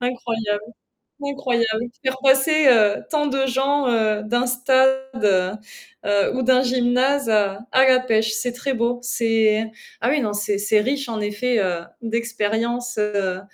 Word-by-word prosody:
Incroyable! 230 -4 -2 0.6
Incroyable! 240 -5 -1 0.2
Faire 260 0 -1
passer, 275 +3 +4
heu, 215 -4 +4
tant 300 -1 0
de 270 -1 0
gens, 270 +2 0
heu, 215 -3 +1
d'un 240 +3 0
stade, 260 +1 +2 1.0
heu, 205 +2 +1
ou 260 - -1
d'un 255 +1 +4
gymnase 255 +1 +1
à 200 -2 +1
à 260 +1 +5
la 255 -1 +5
pêche. 225 -3 0
C'est 245 +3 -2
très 270 +2 -3
beau, 240 0 -1
c'est 225 -2 +1 0.3
ah, 235 - +1
oui, 290 +1 +1
non, 210 -4 -2
c'est 205 0 -1
c'est 210 +1 +2
riche, 275 +3 -2
en 225 -2 -3
effet, 220 +4 -1
heu, 180 -4 -1 0.2
d'expérience, 235 +1 -2
heu, 200 -3 -1
240 Hz, 150 wpm, -21 LUFS, 215-260 Hz, 1.0 s, à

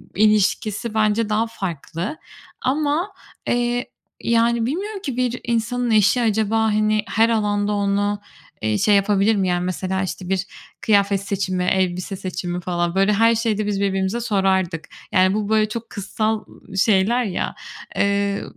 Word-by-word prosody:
ilişkisi 215 +1 +2
bence 215 0 +1
daha 215 +2 +1
farklı 190 - -5 0.4
ama, 300 +8 0 0.3
eee, 245 +1 0 0.3
yani 235 0 +2
bilmiyorum 390 - -3
ki 265 - -4
bir 250 -1 0
insanın 240 +1 -1
eşi 215 +3 +4
acaba, 220 -1 +1
hani, 215 0 +2
her 225 +1 +3
alanda 205 -2 +1
onu, 205 0 0 0.4
eee, 110 -1 0
şey 205 - +4
yapabilir 200 +2 +3
mi? 195 -2 +1
Yani, 175 0 0
mesela, 185 +1 -2
işte, 185 -1 -5
bir 190 0 0 0.4
kıyafet 200 -2 +3
seçimi, 190 -2 -2
elbise 185 +1 0
seçimi 180 -1 -4
falan, 175 0 -1
böyle, 195 +2 +3
her 230 +2 +4
şeyde 220 -2 0
biz 200 -1 -1
birbirimize 195 +3 0
sorardık. 190 -6 0 0.2
Yani, 185 0 +4
bu, 210 0 -2
böyle, 215 -1 +3
çok 230 +1 -6
kızsal, 215 +2 -2 0.3
ııı, 195 - -7
şeyler 215 +4 +3
ya, 200 -6 -3 0.4
eee, 200 0 +1
210 Hz, 145 wpm, -21 LUFS, 190-230 Hz, 0.4 s, eşi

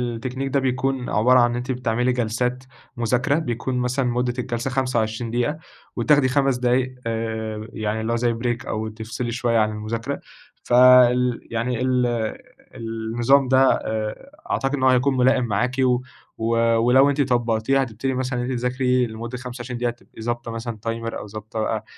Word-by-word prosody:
التكنيك 130 +3 -4
ده 140 - +4
بيكون 130 0 -1
عبارة 125 +4 +4
عن 120 0 +3
أنتِ 125 +2 -3
بتعملي 125 0 0
جلسات 125 +2 -1 0.3
مذاكرة 125 +5 +1
بيكون 125 -3 -3
مثلًا 125 +2 0
مدة 125 0 0
الجلسة 120 +1 -2
25 120 -3 -1
دقيقة 125 +6 0 0.4
وتاخدي 145 -3 +3
5 135 -1 +2
دقايق 125 +1 +1
آآ 110 -1 -3
يعني 110 0 -2
اللي 115 +1 -1
هو - - +1
زي 120 0 +1
بريك 120 +1 -2
أو 110 0 -3
تفصلي 115 +2 -5
شويّة 120 -1 0
عن 110 0 +2
المذاكرة، 110 +2 -4 0.4
فال 125 0 +5
يعني 115 +1 -1
ال 125 -1 +2 0.7
النظام 115 +4 +1
ده 130 +1 +5 0.2
آآ 110 - -4 0.2
عتقد 135 +1 -1
إن 130 - -3
هو 130 - +6
هيكون 130 +1 +2
ملائم 130 0 +3
معاكِ، 120 +4 0 0.6
و 115 +1 0 0.2
ولو 125 +4 +5
أنتِ 145 0 +1
طبقتيه 120 0 +1
هتبتدي 130 +1 -2
مثلًا 130 -1 -2
إن - - -1
أنتِ 125 - -2
تذاكري 125 0 +1
لمدة 115 +2 -6
25 125 0 -6
دقيقة 120 0 0
تبقي 120 -1 -15
ضابطة 120 +1 -3
مثلًا 115 0 -5
تايمر 115 0 -3
أو - - -8
ضابطة 110 +1 -7
بقى 110 0 -1
120 Hz, 165 wpm, -22 LUFS, 115-130 Hz, 0.7 s, هو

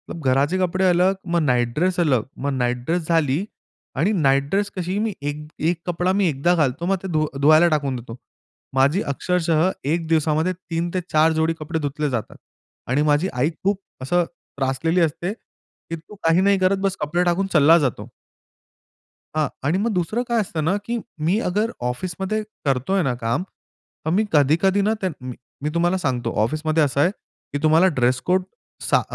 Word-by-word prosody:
घराचे 140 +2 +1
कपडे 185 +1 +1
अलग, 180 +2 +3
मग 170 -1 +1
नाईट 120 -5 +1
ड्रेस 180 +3 +1
अलग. 135 -9 +2 0.2
मग 140 - +1
नाईट 125 -1 0
ड्रेस 165 +1 -1
झाली 165 +1 +1 0.5
आणि 165 +10 +2
नाईट 140 -7 +2
ड्रेस 200 +1 0
कशी 185 +1 -2
मी 220 -1 -1
एक 145 +1 -4 0.2
एक 170 -1 -2
कपडा 175 +1 0
मी 195 - +3
एकदा 160 +5 +1
घालतो. 150 +1 0
मग 195 +2 +2
ते - - -3
धू 155 0 +2 0.2
धुवायला 155 +4 +6
टाकून 140 -3 -3
देतो. 115 -2 -8 0.6
माझी 140 +9 +3
अक्षरशः 165 +3 +1 0.2
एक 165 +3 0
दिवसामध्ये 160 +2 +1
3 170 -1 -4
ते 185 - +1
4 155 +1 +4
जोडी 160 +1 +1
कपडे 160 +2 -3
धुतले 150 0 -2
जातात. 120 -5 -4 0.5
आणि 130 +4 +1
माझी 150 +5 +3
आई 130 +5 +1
खूप 200 0 0 0.2
असं 175 +7 +2
त्रासलेली 150 +1 -2
असते, 170 +4 -1
की 165 -6 -12
तू 165 +6 -13
काही 165 +2 +4
नाही 200 +1 +4
करत, 185 +1 +3
बस 195 -1 0
कपडे 170 +4 +1
टाकून 180 +2 +1
चालला 155 +1 +6
जातो. 125 -7 -2 1.3
हां. 155 -2 +2 0.2
आणि 155 +6 +1
मग 220 +4 0
दुसरं 190 +7 -1
काय 235 -2 +1
असतं 165 -6 -3
ना, 170 +6 +1
की 235 +1 -2 0.3
मी 185 +6 +2
अगर 210 +5 0 0.2
ऑफिसमध्ये 185 +9 -3 0.2
करतोय 140 +8 +1
ना 135 -4 0
काम, 115 +10 0 0.6
तर - - 0
मी 210 +5 +2
कधी-कधी 160 +7 +3
ना. 215 +2 +2
त - - +2 0.2
म 125 0 -6 0.3
मी 150 - 0
तुम्हाला 175 +2 +2
सांगतो 125 -8 -1
ऑफिसमध्ये 155 +6 +1
असं 140 -1 0
आहे, 170 - +4 0.4
की - - 0
तुम्हाला 160 +4 +5
ड्रेस 125 +1 +2
कोड 185 +1 +2 0.5
6 - - +4
165 Hz, 180 wpm, -22 LUFS, 145-185 Hz, 1.3 s, धुवायला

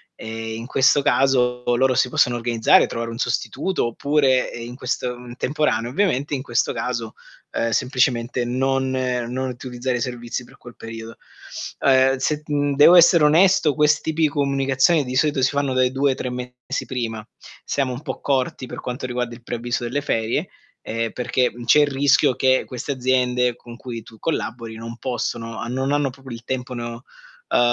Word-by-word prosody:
Ehm, 110 0 -6
in 115 - -7
questo 135 +2 +4
caso, 125 -3 +2
loro 130 +1 +2
si 130 0 +2
possono 125 0 +2
organizzare, 115 -1 +4
trovare 115 0 -4
un 115 - -6
sostituto 125 - -1
oppure, 135 +1 +1
ehm, 115 - -7
in 120 - -8
questo 125 -1 -2
uhm, 120 0 -10
temporaneo 125 -5 0
ovviamente, 145 -3 0
in 130 - -4
questo 120 -4 0
caso, 115 -3 -3 0.4
ehm, 115 - -1
semplicemente 125 0 +1
non 130 +1 0
ehm, 125 -2 -1
non 130 +1 -2
utilizzare 125 0 -3
i - - -5
servizi 120 0 -4
per - - -18
quel 120 -1 -13
periodo. 115 0 -8 0.6
Ehm, 135 0 +4
se, 150 +3 -1
mhmm, 145 -1 0
devo 150 +5 +8
essere 170 -2 +7
onesto, 160 0 +4
questi 150 +2 +2
pi 160 -1 +3
comunicazioni 140 +1 +2
di 125 -1 -5
solito 145 0 +2
si 130 - +4
fanno 140 -2 -1
dai 130 0 +2
2 135 +1 +2
ai - - -2
3 130 - -4
mesi 125 0 -5
prima. 115 -4 -4 0.4
Siamo 135 -3 -1
un 125 - -7
po' - - -5
corti 130 -1 -1
per - - -7
quanto 125 +1 -5
riguarda 125 -1 -3
il 120 - -12
preavviso 120 0 -3
delle 135 +5 -2
ferie, 115 -5 -1 0.3
ehm, 115 0 -3
perché, 125 0 0
mhmm, 120 0 -10
c'è 135 - +6
il 145 - +3
rischio 140 -1 +3
che 130 0 +3
queste 125 +3 -5
aziende 125 -2 +1
con 120 -1 -12
cui 115 -3 -7
tu 110 - -15
collabori 115 -7 -3
non 115 +1 -8
possono 115 -3 -3
a - - -4
non 130 +3 -1
hanno 145 -1 +1
proprio 135 0 -14
il 115 0 -8
tempo 125 +1 -4
no, 120 +1 -6 0.5
ehm, - - +5
125 Hz, 185 wpm, -22 LUFS, 120-135 Hz, 0.6 s, devo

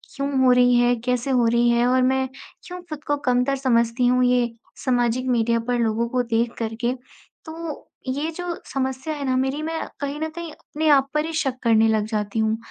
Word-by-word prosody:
क्यों 275 0 -2
हो 255 - +6
रही 245 0 +5
है? 245 0 +4
कैसे 250 +1 0
हो 245 -2 +3
रही 235 +1 +3
है 235 0 +3
और 255 0 +3
मैं 265 0 +2 0.4
क्यों 360 0 -7
खुद 300 -1 -7
को 290 - 0
कमतर 250 +2 +2
समझती 240 -2 +1
हूँ? 250 0 +3
ये 245 -1 +2 0.3
सामाजिक 245 0 +1
मीडिया 235 -1 +2
पर 245 0 +1
लोगों 230 0 0
को 250 0 +1
देख 230 0 0
कर 225 -1 -2
के। 240 0 +1 0.5
तो 320 -1 -7 0.2
ये 285 +5 -2
जो 350 +1 -4 0.2
समस्या 265 +3 -2
है 285 -2 -4
ना 260 -1 +1
मेरी, 265 +3 -1
मैं 320 +1 -3
कहीं 285 +1 -4
न 315 - -1
कहीं 335 0 -7
अपने 310 +1 -4
आप 275 -2 +5
पर 300 +1 +1
ही 325 - -5
शक 270 -5 -1
करने 225 -1 +4
लग 215 -1 +1
जाती 215 0 -2
हूँ। 220 0 +1
250 Hz, 215 wpm, -23 LUFS, 235-285 Hz, 0.5 s, हो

